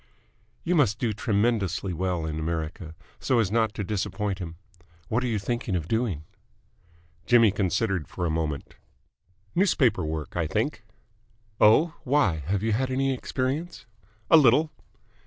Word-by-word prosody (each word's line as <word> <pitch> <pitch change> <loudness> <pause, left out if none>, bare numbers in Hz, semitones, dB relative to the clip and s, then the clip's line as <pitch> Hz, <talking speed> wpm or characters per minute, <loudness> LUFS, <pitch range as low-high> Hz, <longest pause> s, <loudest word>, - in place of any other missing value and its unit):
"You 175 - 0
must 125 - +3
do 115 -3 -1
tremendously 100 -3 0
well 90 -1 -2
in 80 0 -3
America, 80 0 -4 0.2
so 130 - +1
as 110 -5 +1
not 110 -1 +1
to 105 - -3
disappoint 100 0 -2
him. 85 -3 -6 0.5
What 120 +3 0
are - - 0
you 115 -3 0
thinking 105 0 -2
of 80 -3 -2
doing?" 110 -9 -1 1.0
Jimmy 115 -4 +6
considered 95 -2 -1
for 90 - -4
a 85 - 0
moment. 80 -3 -3 0.8
"Newspaper 140 - +2
work, 80 -1 -4
I 85 -3 0
think." - - -2 0.8
"Oh? 155 +10 +5
Why, 135 - +2
have 100 +2 0
you 110 - +1
had 130 +5 0
any 135 +1 +1
experience?" 135 +6 -3 0.5
"A 165 - +10
little." 150 +3 +4
105 Hz, 145 wpm, -26 LUFS, 90-125 Hz, 1.0 s, A